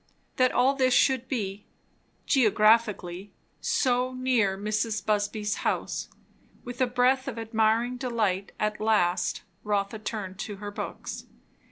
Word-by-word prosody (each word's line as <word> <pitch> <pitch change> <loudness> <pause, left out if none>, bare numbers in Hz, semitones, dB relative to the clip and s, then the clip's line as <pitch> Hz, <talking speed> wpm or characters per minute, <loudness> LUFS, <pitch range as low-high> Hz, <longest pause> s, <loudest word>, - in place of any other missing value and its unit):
That 255 -1 +4
all 255 +3 +3
this 260 -2 +2
should 260 -1 +3
be, 205 -6 -4 0.6
geographically, 215 -5 +2 0.3
so 250 -1 +1
near 245 -7 +1
Mrs. 215 +2 -2
Busby's 210 0 0
house! - - -2 0.5
With 245 +1 -7
a 255 - +4
breath 255 +2 +2
of 250 -4 -4
admiring 225 +2 +1
delight, 215 -7 -1
at 215 0 -1
last 210 -5 +1 0.2
Rotha 205 +1 -1
turned 205 -3 -5
to 210 -1 -5
her 205 +1 -7
books. - - -6
220 Hz, 125 wpm, -27 LUFS, 205-250 Hz, 0.6 s, That